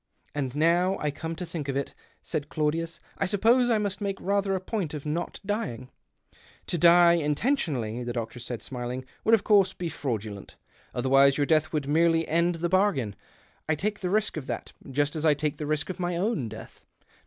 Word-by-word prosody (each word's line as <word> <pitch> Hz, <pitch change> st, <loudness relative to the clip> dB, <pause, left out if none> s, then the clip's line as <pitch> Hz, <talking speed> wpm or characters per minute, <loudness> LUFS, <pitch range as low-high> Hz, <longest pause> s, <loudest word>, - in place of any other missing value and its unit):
" -, -, -39 dB
And 135 Hz, -3 st, -3 dB
now 175 Hz, +5 st, +3 dB
I 150 Hz, -, -1 dB
come 160 Hz, +3 st, -5 dB
to 180 Hz, -, -5 dB
think 160 Hz, -4 st, -5 dB
of 135 Hz, -, -1 dB
it," 140 Hz, -, -3 dB, 0.3 s
said 150 Hz, -3 st, -3 dB
Claudius, 165 Hz, +2 st, -1 dB
" -, -, -29 dB
I -, -, +2 dB
suppose 230 Hz, +6 st, +3 dB
I 230 Hz, -, +4 dB
must 205 Hz, -1 st, -2 dB
make 195 Hz, -1 st, -2 dB
rather 200 Hz, 0 st, +1 dB
a -, -, -1 dB
point 185 Hz, -5 st, -3 dB
of 150 Hz, -, -7 dB
not 165 Hz, +4 st, -3 dB
dying? 165 Hz, -, -3 dB, 0.3 s
" -, -, -31 dB
" -, -, -28 dB
To 175 Hz, -, 0 dB
die 170 Hz, +1 st, +7 dB
intentionally," 150 Hz, -, 0 dB
the 120 Hz, -, -3 dB
doctor 115 Hz, 0 st, -4 dB
said, 120 Hz, -1 st, -6 dB
smiling, 125 Hz, 0 st, -5 dB
" -, -, -34 dB
would, 225 Hz, -, +6 dB
of 210 Hz, -, -3 dB
course, 195 Hz, -3 st, +4 dB
be 175 Hz, -2 st, -4 dB
fraudulent. 110 Hz, -9 st, -5 dB, 0.4 s
Otherwise 135 Hz, +2 st, +4 dB
your 145 Hz, -, +2 dB
death 155 Hz, 0 st, +2 dB
would 150 Hz, -3 st, -2 dB
merely 165 Hz, +2 st, +3 dB
end 170 Hz, +2 st, +2 dB
the 170 Hz, +1 st, -1 dB
bargain 170 Hz, -, +2 dB, 0.3 s
— -, -, -23 dB
I 155 Hz, -, +3 dB
take 205 Hz, +6 st, -2 dB
the 180 Hz, -, -2 dB
risk 210 Hz, -2 st, +1 dB
of 140 Hz, -, -5 dB
that -, -, -5 dB
— -, -, -13 dB
just 145 Hz, +3 st, 0 dB
as 155 Hz, -, -3 dB
I 155 Hz, -2 st, +5 dB
take 150 Hz, 0 st, -2 dB
the 150 Hz, -, -4 dB
risk 155 Hz, +3 st, -1 dB
of 185 Hz, -, -10 dB
my 175 Hz, -1 st, -1 dB
own 190 Hz, -, -1 dB
death. 110 Hz, -, -11 dB
160 Hz, 220 wpm, -27 LUFS, 140-185 Hz, 0.4 s, die